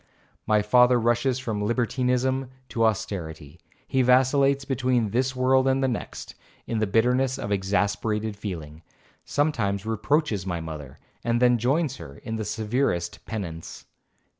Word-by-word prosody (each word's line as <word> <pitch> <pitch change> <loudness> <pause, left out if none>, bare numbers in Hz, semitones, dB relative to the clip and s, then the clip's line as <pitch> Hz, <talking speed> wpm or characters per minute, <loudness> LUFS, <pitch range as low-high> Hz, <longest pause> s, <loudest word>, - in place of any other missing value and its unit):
My 105 -1 +3
father 125 +3 +5
rushes 120 +2 +1
from 110 -5 -3
libertinism 125 +3 0 0.2
to 115 -1 +1
austerity,—he 85 - -3
vacillates 135 +2 +3
between 125 -5 0
this 130 +3 0
world 130 +1 +3
and 135 0 +2
the - - +3
next;—in 115 -1 -6
the 110 - +1
bitterness 125 +5 +2
of 105 - -5
exasperated 105 +2 0
feeling, 80 -7 -7 0.4
sometimes 110 -10 0
reproaches 110 - 0
my 90 -2 -3
mother, 75 -5 -8 0.3
and 120 0 +1
then 125 -1 +4
joins 135 +3 +1
her 75 -4 -10
in 110 -1 -5
the 110 - -3
severest 110 -5 -1
penance. 85 -7 -6
115 Hz, 130 wpm, -25 LUFS, 100-130 Hz, 0.4 s, father